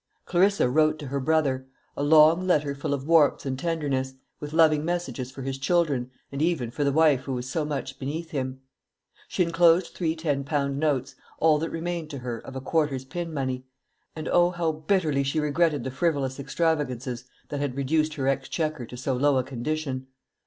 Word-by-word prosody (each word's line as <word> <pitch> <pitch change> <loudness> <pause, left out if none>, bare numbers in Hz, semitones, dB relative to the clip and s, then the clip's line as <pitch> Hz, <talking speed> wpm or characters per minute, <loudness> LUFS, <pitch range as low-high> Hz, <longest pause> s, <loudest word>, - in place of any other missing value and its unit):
Clarissa 190 -3 +3
wrote 155 +4 +3
to 150 - -8
her 140 +1 -1
brother 135 -3 +1 0.3
a - - -3
long 160 +4 +5
letter 150 -5 +2
full 140 0 -4
of 140 -1 -2
warmth 160 -3 +4
and 130 -1 -2
tenderness, 140 -5 -1 0.2
with 150 0 -6
loving 155 -2 +4
messages 155 -7 -3
for 135 0 -8
his 135 0 -4
children, 140 -5 +1 0.2
and 140 +1 -4
even 155 -8 0
for 145 - -2
the 140 - +2
wife 145 -3 +3
who 135 - -3
was 125 0 -4
so 155 +4 -1
much 145 -2 -4
beneath 160 +5 -4
him. 130 -2 -3 0.7
She 180 - +1
enclosed 170 +1 +3
three 165 -3 -1
ten 150 -4 -1
pound 140 -1 -1
notes, 140 -4 0 0.2
all 155 -2 +4
that 165 +1 -2
remained 165 -1 -4
to 145 - -6
her 120 -2 -4
of 135 - -10
a 130 - -4
quarter's 140 -2 0
pin 170 +3 -5
money; 130 -3 -2 0.5
and 155 -1 -5
O, 175 0 +4
how 175 -2 0
bitterly 155 -2 +1
she 140 +3 0
regretted 150 -2 +1
the 130 - -4
frivolous 140 -3 -1
extravagances 135 -6 -1 0.2
that 145 - -3
had 140 -2 -2
reduced 155 +2 +1
her 135 -3 -2
exchequer 135 0 -1
to 125 - -9
so 130 +2 -1
low 140 +1 +3
a 130 - +2
condition! 130 +1 -3
145 Hz, 190 wpm, -26 LUFS, 135-160 Hz, 0.7 s, long